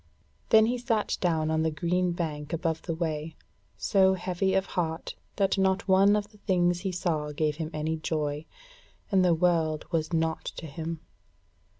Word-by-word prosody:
Then 220 -1 +7
he 245 +2 0
sat 225 -3 0
down 160 -3 +1
on 160 0 +1
the 160 - +2
green 175 +3 0
bank 155 -3 -4
above 165 -1 -1
the 165 - -3
way, 160 -1 -3 0.4
so 190 -1 +3
heavy 185 +1 -1
of 190 0 +2
heart 165 -3 -3 0.2
that 195 -1 +1
not 190 +1 +1
one 195 +2 +5
of 205 0 -2
the 210 - -20
things 175 -3 +1
he 190 +1 -2
saw 160 -4 -1
gave 150 0 -1
him 160 -2 -3
any 155 +1 -2
joy, 155 -1 -2 0.6
and 190 -2 +4
the 175 -2 +4
world 160 -3 +1
was 160 -1 -1
naught 160 -1 0
to - - -7
him. 160 +2 -5
170 Hz, 175 wpm, -28 LUFS, 160-190 Hz, 0.6 s, Then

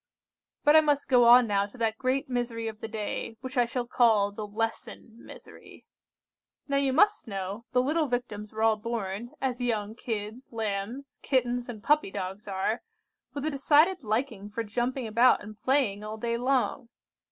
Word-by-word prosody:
"But 295 0 +6
I 315 - +9
must 290 -2 +1
go 245 -2 +5
on 245 +1 +8
now 200 -2 +1
to 205 - -16
that 225 -2 -1
great 265 +2 0
misery 240 -2 -2
of 220 0 -7
the - - -4
day, 220 0 -4
which 260 +1 -7
I 245 -1 +4
shall 240 +1 -3
call 220 -4 +3
the 210 +1 -6
lesson 225 +2 -5
misery. - - -13 0.8
"Now 280 -1 +1
you 275 -1 +2
must 415 - +3
know, 195 +2 -5
the 250 0 +3
little 305 +3 +1
Victims 230 -4 -4
were 220 0 -3
all 220 -1 +4
born, 215 0 -4
as 255 -2 -2
young 220 -3 -1
kids, 225 +1 -5
lambs, 225 +4 -4
kittens, 245 -2 0
and 220 -3 -8
puppy 300 -2 +3
dogs 195 +1 -6
are, 195 +4 -1 0.5
with 285 0 -3
a 310 - 0
decided 305 +6 +3
liking 220 -3 -2
for 230 +2 -3
jumping 240 +4 -2
about 230 +2 +4
and 215 +1 -9
playing 220 -4 0
all 215 +1 -6
day 235 +1 -1
long. 250 0 0
235 Hz, 175 wpm, -28 LUFS, 215-260 Hz, 0.8 s, I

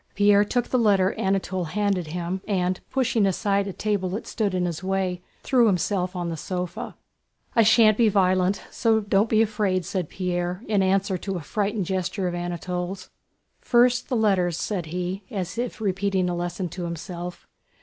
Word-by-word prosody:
Pierre 205 0 +5
took 245 +3 -1
the 255 - +2
letter 200 -4 +3
Anatole 190 -1 -1
handed 195 0 -1
him 175 +3 -3
and, 185 -2 0
pushing 235 -6 +2
aside 200 +1 +1
a - - -3
table 200 -1 -1
that 200 +5 -4
stood 205 -5 -1
in 180 -1 +1
his 170 0 -4
way, 185 -1 -1 0.2
threw 245 -3 +4
himself 185 -1 0
on 175 -1 -2
the 165 - -3
sofa. 180 +2 -5 0.6
"I 230 - +6
shan't 220 -1 +5
be 230 -2 +5
violent, 185 -1 +2 0.2
don't 220 -2 +3
be 220 0 +4
afraid!" 205 -5 0
said 180 -3 -3
Pierre 180 +1 -2
in 205 -2 +2
answer 190 0 +1
to 195 0 -3
a - - -5
frightened 205 +5 -1
gesture 185 +1 -2
of 175 - -2
Anatole's. 180 +2 -4 0.5
"First, 250 +2 +3
the 255 - 0
letters," 185 -6 +2
said 180 -5 -3
he, 180 +3 -3
as 195 +2 -4
if 245 -1 -3
repeating 195 -2 0
a - - -2
lesson 175 +1 -3
to 175 +1 -5
himself. 175 +1 -6
190 Hz, 170 wpm, -25 LUFS, 180-205 Hz, 0.6 s, I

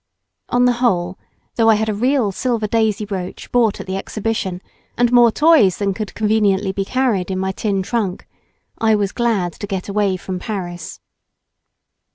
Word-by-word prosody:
On 245 0 +3
the 250 - +5
whole, 180 -6 +1 0.4
though 225 -1 +4
I 220 - +6
had 220 +1 -1
a 215 - 0
real 245 0 +1
silver 235 +1 -1
daisy 215 -1 0
brooch 190 -3 -6
bought 235 -4 +2
at - - -6
the 190 0 -3
Exhibition, 195 -3 -3 0.4
and 245 0 +3
more 240 -2 +6
toys 290 - +4
than 200 -1 0
could 210 +1 -6
conveniently 210 -3 +1
be 195 +1 -2
carried 235 -7 0
in 190 - -2
my 190 0 -1
tin 195 -1 -1
trunk, 200 -3 -2 0.5
I 220 -1 +3
was 200 -2 0
glad 215 -8 0
to 205 - -7
get 190 -2 -4
away 200 -2 +1
from 185 0 -5
Paris. 175 -5 -6
210 Hz, 175 wpm, -19 LUFS, 190-230 Hz, 0.5 s, I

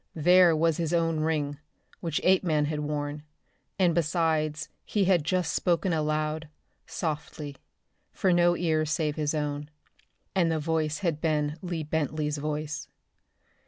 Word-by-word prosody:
There 175 +1 +6
was 165 0 +2
his 170 -1 -1
own 165 -1 +1
ring, 150 -2 -1 0.4
which 165 -3 -1
Apeman 175 -5 +3
had 150 0 -2
worn, 150 0 -3 0.6
and 180 -3 +3
besides 155 -2 0 0.2
he 205 -2 0
had 180 -4 +3
just 175 -1 0
spoken 175 +1 +1
aloud, 155 0 -1 0.4
softly, 150 -3 -4 0.5
for 185 -2 +1
no 175 0 +4
ears 155 -3 +1
save 155 -1 0
his 150 0 -1
own, 145 -1 -3 0.6
and 175 -4 +2
the 160 - +1
voice 155 -1 0
had 155 -3 0
been 150 -2 0
Lee 175 -3 -3
Bentley's 150 -1 -1
voice. 150 0 -3
155 Hz, 135 wpm, -28 LUFS, 150-170 Hz, 0.6 s, There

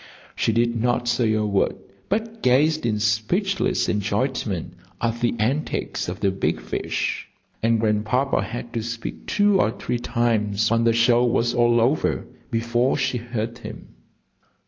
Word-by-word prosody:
She - - +1
did 115 0 +1
not 120 0 +1
say 120 -2 +2
a 110 -1 +1
word, 100 -2 +1 0.3
but 225 +2 -2
gazed 145 +2 +3
in 110 -2 0
speechless 115 - +1
enjoyment 105 - -1 0.3
at 115 0 -1
the 120 0 +1
antics 125 - -1
of 90 - -6
the 100 -2 +2
big 95 - -1
fish. - - -3 0.3
And 115 0 +2
Grandpapa 110 +5 +1
had 120 0 -6
to 115 - -1
speak 115 0 -6
two 205 -2 +3
or - - +2
three 120 +2 -3
times 110 -4 0
when 115 0 +2
the 115 - +4
show 120 +1 +4
was 120 0 +1
all 120 -1 +3
over 125 +7 +1 0.2
before 120 +2 +1
she 135 -3 0
heard 120 0 -4
him. - - -9
120 Hz, 150 wpm, -23 LUFS, 110-125 Hz, 0.3 s, the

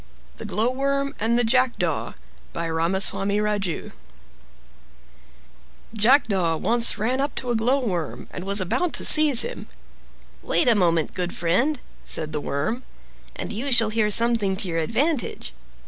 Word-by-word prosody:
THE - - -8
GLOWWORM 270 +7 -1
AND 230 +2 0
THE 245 - +1
JACKDAW 255 +2 -1 0.4
By 170 0 -4
Ramaswami 190 +4 +1
Raju 210 -5 -3 2.0
Jackdaw 210 - +2
once 235 +4 +2
ran 245 +6 -1
up 285 - -3
to 250 -2 -4
a - - 0
Glowworm 225 - -2
and 180 - -7
was 200 +1 +1
about 240 - -1
to - - -1
seize 300 -5 +7
him. - - -7 0.7
"Wait 305 - +1
a 240 - +6
moment, 170 -6 0
good 180 -1 -4
friend," 240 - 0 0.2
said 155 -1 0
the 150 -1 -4
Worm, 150 - -3 0.5
"and - - -6
you 260 +6 -4
shall 225 -3 +6
hear 215 -1 0
something 225 -3 +2
to 195 0 -2
your 165 -1 -2
advantage." 235 - -2
220 Hz, 140 wpm, -23 LUFS, 185-250 Hz, 2.0 s, seize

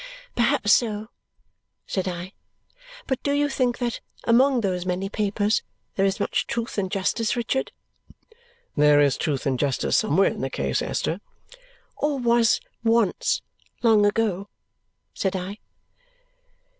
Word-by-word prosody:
"Perhaps 240 -3 +3
so," 215 -2 +1 0.8
said 190 -1 -2
I. 180 +1 -5 0.7
"But 265 - -2
do 285 - 0
you 290 0 +2
think 255 -3 0
that, 240 -2 -3 0.2
among 250 +2 +4
those 185 -4 -1
many 185 +2 -2
papers, 210 0 0 0.3
there 195 0 +3
is 195 - -1
much - - 0
truth 235 -2 -3
and 190 -2 -1
justice, 210 +4 0
Richard?" 245 +3 -1 1.0
"There 150 -1 +5
is 140 -3 +4
truth 140 -4 -2
and 130 -3 0
justice 140 -4 +1
somewhere 185 +7 +3
in - - -6
the 135 - -1
case, 70 - -1
Esther 175 +5 -2 0.4
" - - -31
"Or 295 -1 +1
was 235 -2 +3 0.2
once, 230 -3 +2 0.4
long 220 -3 +5
ago," 205 -2 0 0.6
said 190 -1 -1
I. 190 +3 -5
210 Hz, 135 wpm, -24 LUFS, 185-235 Hz, 1.0 s, There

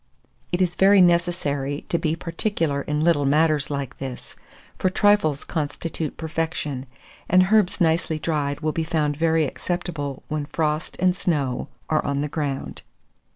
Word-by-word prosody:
(It 175 +1 +2
is 175 -1 0
very 195 +2 +5
necessary 170 -6 +1
to 170 - +1
be 160 -1 0
particular 165 -3 -1
in 150 +2 -1
little 165 -4 +3
matters 150 +1 +2
like 140 -2 -4
this, 130 -2 -7 0.4
for 185 - +2
trifles 185 -7 +3
constitute 155 0 -3
perfection, 160 -4 -3 0.4
and 185 +1 +5
herbs 205 -3 +3
nicely 160 -2 +2
dried 145 -2 -1
will 155 0 0
be 165 - -1
found 155 -3 0
very 160 0 +2
acceptable 150 -3 -4
when 150 -1 -3
frost 155 0 -2
and 185 0 +3
snow 145 -9 -1 0.2
are 155 - +1
on 140 0 -1
the 150 - -1
ground. 145 -2 -4
155 Hz, 150 wpm, -23 LUFS, 145-170 Hz, 0.4 s, very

